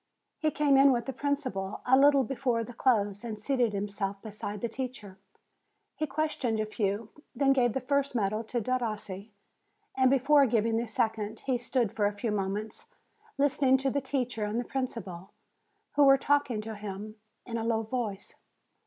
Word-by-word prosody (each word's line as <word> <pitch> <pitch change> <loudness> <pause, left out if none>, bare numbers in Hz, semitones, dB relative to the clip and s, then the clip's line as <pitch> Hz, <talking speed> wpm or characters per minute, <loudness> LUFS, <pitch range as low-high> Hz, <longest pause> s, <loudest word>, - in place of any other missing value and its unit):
He 310 - +2
came 290 -2 +3
in 275 0 +7
with 240 -2 0
the 270 - -4
principal 255 -9 -2
a 255 - +5
little 280 0 +6
before 245 -2 -1
the 245 - -9
close 205 -5 +1
and 220 -3 -5
seated 245 0 +1
himself 200 -1 -3
beside 210 -2 -6
the 235 - 0
teacher. 230 -6 -7 0.8
He 310 - -2
questioned 275 -6 -1
a 215 - 0
few, 210 0 -2 0.2
then 275 -1 +4
gave 245 -4 +2
the 265 - -2
first 280 +1 0
medal 215 0 0
to 240 +2 -2
Derossi, 215 -4 -3 0.7
and 260 -1 +4
before 275 +1 +5
giving 225 0 +1
the 235 +1 -1
second, 220 -1 -2
he 260 -3 0
stood 245 -3 0
for 205 -2 +1
a 205 - -2
few 215 +2 -3
moments 205 +1 -3 0.5
listening 275 -2 +3
to 270 0 -1
the 280 - 0
teacher 250 -4 -2
and 210 +3 -1
the - - -1
principal, 200 -9 -5 0.6
who 290 - +4
were 275 0 +7
talking 275 -5 +1
to 220 +1 -6
him 210 +1 -7 0.3
in 230 -2 -3
a - - -3
low 225 -1 0
voice. 220 -4 -4
235 Hz, 175 wpm, -29 LUFS, 210-270 Hz, 0.8 s, in